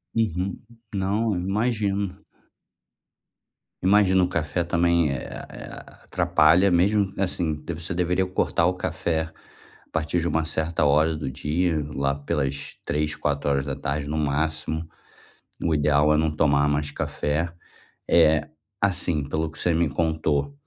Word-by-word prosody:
Uhum. 95 -4 -1 0.3
Não, 100 +3 0
eu 90 - -2
imagino. 100 -1 -1 1.6
Imagino. 95 -1 +4
O - - +2
café 85 0 -1
também 85 -2 +2
eh 70 -2 -4
a - - -8
eh - - -8
a - - -14
atrapalha 85 +6 +4
mesmo, 100 +3 +3
assim, 85 -5 -1
você 85 0 -3
deveria 90 +2 +1
cortar 90 -2 +1
o 90 - +3
café 85 -2 -1 0.7
a - - -33
partir 80 +2 0
de 85 - -1
uma 80 -1 0
certa 80 0 -1
hora 75 +2 +3
do 75 -3 -4
dia, 75 +4 0
lá 70 0 0
pelas 70 -1 -3
15:00, 75 +1 -1
16:00, 70 0 -1
no 75 +1 -2
máximo. 80 +2 -1 0.8
O 85 - +1
ideal 75 +1 +3
é - - +3
não 80 0 +1
tomar 75 -1 +3
mais 75 0 0
café. 75 +5 -2 0.6
Eh, 80 -3 +5 0.4
assim, 90 -5 +1
pelo 80 +3 -2
que 80 - -11
você 90 - +1
me 85 +1 +2
contou, 80 - 0
80 Hz, 140 wpm, -24 LUFS, 75-90 Hz, 1.6 s, Eh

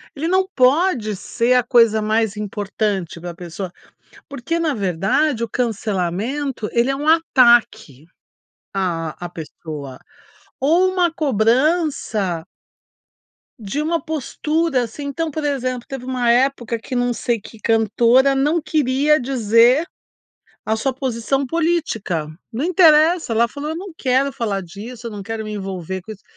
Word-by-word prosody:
ele 315 +4 -2
não 375 +1 +2
pode 255 - +2
ser 235 +5 0
a 250 - +5
coisa 230 -3 +4
mais 220 0 0
importante 205 -4 -3
para 175 - -6
a 170 - -8
pessoa. 175 +1 -7 0.6
Porque 285 +4 -3
na 315 -3 0
verdade 210 - 0
o 230 - -3
cancelamento 220 +3 -2
ele 235 +2 +2
é 270 - +1
um 295 +2 -4
ataque 240 - +3 0.7
a 165 -5 -2
a - - -4
pessoa, 150 -4 -8 0.6
ou 340 +7 +3
uma 355 -2 +2
cobrança 240 - +1 1.1
de 220 +8 -3
uma 330 +2 0
postura 310 -1 -1
assim, 260 +6 -7
então 315 +3 -3
por 310 +1 -4
exemplo, 255 -4 -2
teve 265 -2 -7
uma 250 -2 0
época 240 -2 +2
que 250 +3 -7
não 245 0 +1
sei 235 -1 -1
que 225 - -13
cantora 235 +5 +3
não 300 +5 +1
queria 300 0 +2
dizer 245 - +3 0.8
a 220 +1 0
sua 260 +4 -1
posição 260 +1 -1
política. 310 - -1 0.2
Não 255 +7 -2
interessa, 325 -4 +4
ela 230 +1 +3
falou: 290 +5 -6
"Eu 320 - -4
não 375 0 -7
quero 265 +1 +1
falar 210 -6 -2
disso, 220 +7 -8
eu - - -9
não 205 -2 -7
quero 225 +2 -5
me 215 0 -6
envolver 190 -2 -5
com 220 - -8
isso." 205 - -14
245 Hz, 145 wpm, -20 LUFS, 210-290 Hz, 1.1 s, a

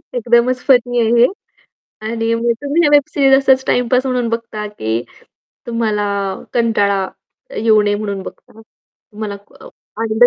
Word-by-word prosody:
एकदमच 240 +2 +2
फनी 245 -2 +3
आहे 225 0 +1
हे. - - +7 0.8
आणि 225 +1 -1
मग 235 +1 +1
तुम्ही 290 +4 +1
या - - +4
वेब 290 -1 +7
सीरीज 270 -2 +4 0.2
असच 265 0 +4
टाईम 245 -1 +1
पास 255 +2 +2
म्हणून 250 -2 0
बघता 230 -2 -4
की 115 - -3 0.6
तुम्हाला 220 -3 -1 0.5
कंटाळा 205 -4 +1 0.5
अ, - - -11
येऊ 215 -1 +3
नये 205 0 +1
म्हणून 200 -2 -4
बघता. 220 - -12
अ, - - -13
तुम्हाला 210 -1 -10 0.3
अ, - - -12 0.3
आनंद 220 +2 +3
230 Hz, 160 wpm, -17 LUFS, 215-245 Hz, 0.8 s, हे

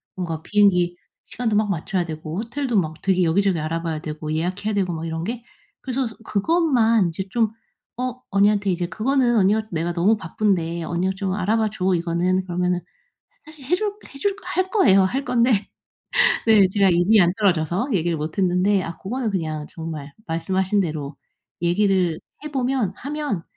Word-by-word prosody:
뭔가 165 -4 -4
비행기 180 -3 +3 0.3
시간도 225 -3 -2
막 210 -1 +2
맞춰야 180 0 -1
되고 155 +1 -6
호텔도 240 +1 -2
막 160 -3 -2
되게 185 -2 +2
여기저기 180 +1 +2
알아봐야 165 0 -2
되고 155 0 -5
예약해야 185 +6 -2
되고 185 -4 0
막 160 0 -5
이런 160 0 -3
게. 235 +4 -4 0.4
그래서 260 -1 -2
서 225 - -10
그것만 230 - +2
이제 185 +3 -5
좀 225 -3 +1 0.5
어 255 0 -3
언니한테 200 0 +3
이제 175 -1 0
그거는 240 +2 +1
언니가 210 +3 +3
"내가 165 +1 -1
너무 180 +6 +2
바쁜데 170 -2 -1
언니가 175 +3 -1
좀 190 -1 -2
알아봐 215 +2 +1
줘. 185 -3 +1
이거는." 175 +2 0
그러면은 180 0 0 0.7
사실 310 -3 -14
해줄 385 +8 0 0.2
해줄 390 +8 -1
할 370 0 -1
거예요. 335 - +5
할 265 +9 -1
건데 235 -5 +2 0.8
네. 215 -3 +6
제가 195 0 +3
입이 185 +4 +4
안 175 -1 +5
떨어져서 180 - +1
얘기를 170 -3 +1
못 155 +3 -5
했는데 185 +1 +2
아 165 - -6
고거는 235 +2 -3
그냥 155 -4 -3
정말 155 -4 -7
말씀하신 190 +4 0
대로 155 -5 -3 0.5
얘기를 180 -2 +2 0.2
해보면 260 -8 -1
하면 285 - -3
190 Hz, 350 characters per minute, -22 LUFS, 170-225 Hz, 0.8 s, 네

